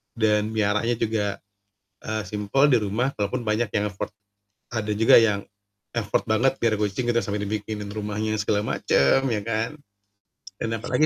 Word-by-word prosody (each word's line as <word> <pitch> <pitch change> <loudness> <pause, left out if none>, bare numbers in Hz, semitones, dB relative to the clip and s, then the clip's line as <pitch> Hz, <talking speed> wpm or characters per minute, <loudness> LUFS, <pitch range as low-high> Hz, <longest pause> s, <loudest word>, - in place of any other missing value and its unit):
dan 105 -2 +2
meliharanya 110 +3 +1
juga, 110 -2 0 0.8
eee, 110 0 -3
simpel 105 +9 +2
di 125 - +6
rumah 110 +6 -1
walaupun 115 +4 -2
banyak 110 +2 0
yang 105 - +1
effort 95 - -4 0.6
ada 110 -2 -2
juga 110 +2 +6
yang 105 -3 +4 0.6
effort 105 -3 0
banget 120 +5 +3
biar 115 -2 +2
kucing 105 +4 -1
gitu 115 - +3
sampai 105 0 -2
dibikinin 105 0 -4
rumahnya 105 +1 -2
segala 105 0 +1 0.2
macam 70 - +3
ya, 105 - 0
kan. 115 0 -1 0.9
Dan 115 - -3
apalagi 125 +6 +1
110 Hz, 150 wpm, -24 LUFS, 105-115 Hz, 0.9 s, di